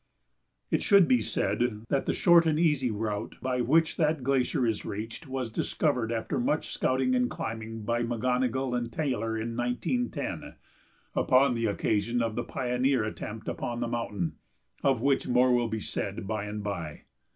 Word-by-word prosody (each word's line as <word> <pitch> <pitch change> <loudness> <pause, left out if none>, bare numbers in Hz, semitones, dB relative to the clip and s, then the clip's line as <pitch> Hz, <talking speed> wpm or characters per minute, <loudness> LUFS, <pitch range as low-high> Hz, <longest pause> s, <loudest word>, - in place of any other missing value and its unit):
It - - +2
should 200 -5 +6
be 125 -2 +4
said 105 +2 -1
that 135 - 0
the - - +1
short 170 -2 +6
and 155 -1 +2
easy 150 -7 +2
route 105 -1 -3
by 130 -1 -1
which 155 +6 +3
that 155 -3 +1
glacier 130 -1 +1
is 110 -2 -1
reached 115 +9 -6
was 130 -3 -3
discovered 125 -1 0
after 115 -1 -2
much 150 +6 0
scouting 130 0 +1
and 125 -1 +2
climbing 115 0 -5
by 120 +2 0
McGonogill 125 +2 0
and 120 -1 -2
Taylor 115 -6 -1
in 115 +1 -3
1910, 125 - -2 0.6
upon 130 0 +4
the 115 -1 0
occasion 110 +3 0
of 115 -1 -1
the - - -1
"pioneer" 130 -1 0
attempt 110 0 -6
upon 120 0 -3
the 120 - -1
mountain, 105 -7 -3 0.4
of 135 -4 +2
which 140 0 +2
more 125 +1 +4
will 120 -1 +2
be 110 - -2
said 100 - -4
by 105 0 -2
and 105 0 -5
by. 85 -7 -5
120 Hz, 165 wpm, -28 LUFS, 110-130 Hz, 0.6 s, should